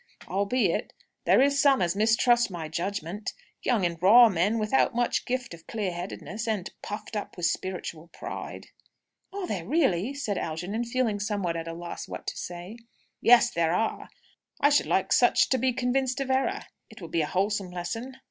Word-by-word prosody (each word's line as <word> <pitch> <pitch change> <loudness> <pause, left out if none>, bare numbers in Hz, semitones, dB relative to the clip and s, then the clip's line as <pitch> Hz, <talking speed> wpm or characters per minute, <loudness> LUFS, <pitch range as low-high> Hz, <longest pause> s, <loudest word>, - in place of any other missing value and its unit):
"Albeit 200 +6 0 0.3
there - - +5
is 280 0 +2
some 275 -1 +5
as 175 0 +1
mistrust 230 +3 +3
my 170 -4 -5
judgment; 190 +4 -4 0.3
young 225 -7 +1
and 170 -1 -3
raw 230 +5 +8
men 195 +4 +1
without 220 +3 +2
much 240 0 0
gift 255 -5 -2
of 165 -1 -13
clear 210 -5 -2
headedness, 195 +5 -6
and 210 -5 -2
puffed 210 +1 -6
up 205 - -5
with 175 - -1
spiritual 170 -2 -3
pride." 165 - -8 0.6
"Are 395 -1 -4
there, 195 - -3
really?" 255 - +1
said 225 -9 -2
Algernon, 180 +9 -3
feeling 235 -3 0
somewhat 200 -5 -1
at 165 0 -4
a 165 - -4
loss 170 +1 -7
what - - -7
to - - -3
say. 175 +5 -7 0.4
"Yes, 240 0 +6
there 170 0 +1
are. 225 +3 -1 0.5
I 285 - +4
should 290 - +3
like - - +2
such - - +4
to 260 - +2
be 260 +2 +2
convinced 255 +1 0
of 270 -1 -1
error. 270 +10 0 0.3
It 220 - -13
would 170 -3 -9
be 165 - +1
a 150 - -1
wholesome 195 +1 0
lesson." 225 +9 -5
210 Hz, 180 wpm, -27 LUFS, 175-245 Hz, 0.6 s, raw